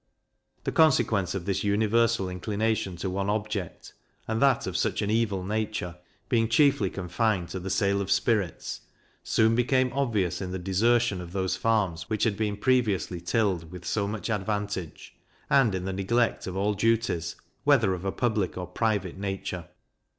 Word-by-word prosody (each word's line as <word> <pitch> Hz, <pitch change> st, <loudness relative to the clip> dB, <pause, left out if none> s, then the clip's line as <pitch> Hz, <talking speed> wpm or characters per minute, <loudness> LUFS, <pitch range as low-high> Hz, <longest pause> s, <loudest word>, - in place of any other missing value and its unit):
The -, -, -1 dB
consequence 110 Hz, -, +3 dB
of 90 Hz, -3 st, -4 dB
this 95 Hz, -2 st, -1 dB
universal 110 Hz, 0 st, +2 dB
inclination 100 Hz, +1 st, -1 dB
to 90 Hz, +2 st, -3 dB
one 100 Hz, +1 st, -1 dB
object, 105 Hz, -4 st, -3 dB, 0.3 s
and 110 Hz, 0 st, -1 dB
that 135 Hz, -3 st, +3 dB
of -, -, -4 dB
such -, -, 0 dB
an 105 Hz, -, -1 dB
evil 105 Hz, -4 st, +1 dB
nature, 105 Hz, -3 st, -2 dB, 0.3 s
being 115 Hz, -3 st, +2 dB
chiefly 115 Hz, -5 st, +4 dB
confined 90 Hz, 0 st, -1 dB
to 95 Hz, -, -4 dB
the 95 Hz, +2 st, -5 dB
sale 100 Hz, 0 st, +1 dB
of 100 Hz, -, -4 dB
spirits, 105 Hz, -3 st, 0 dB, 0.4 s
soon 110 Hz, 0 st, +3 dB
became 125 Hz, +1 st, +2 dB
obvious 110 Hz, -11 st, 0 dB
in 95 Hz, -, -4 dB
the 95 Hz, -, -3 dB
desertion 100 Hz, +3 st, +2 dB
of 90 Hz, 0 st, -9 dB
those 95 Hz, -1 st, 0 dB
farms 95 Hz, -5 st, 0 dB
which 110 Hz, -1 st, 0 dB
had 110 Hz, -4 st, +2 dB
been 105 Hz, -1 st, -1 dB
previously 105 Hz, -9 st, +1 dB
tilled 90 Hz, -4 st, 0 dB
with 90 Hz, -1 st, -9 dB
so 100 Hz, +1 st, 0 dB
much 110 Hz, +2 st, -3 dB
advantage, 105 Hz, -4 st, -3 dB, 0.4 s
and 120 Hz, -8 st, +4 dB
in 90 Hz, 0 st, -3 dB
the 95 Hz, -, -2 dB
neglect 115 Hz, +5 st, 0 dB
of 95 Hz, -, -4 dB
all 100 Hz, +2 st, +1 dB
duties, 105 Hz, -6 st, 0 dB, 0.3 s
whether 125 Hz, -9 st, +4 dB
of 90 Hz, -1 st, -5 dB
a 95 Hz, -, -1 dB
public 110 Hz, -7 st, -1 dB
or 90 Hz, -, -3 dB
private 100 Hz, -4 st, -1 dB
nature. 95 Hz, -4 st, -4 dB
100 Hz, 165 wpm, -27 LUFS, 95-115 Hz, 0.4 s, chiefly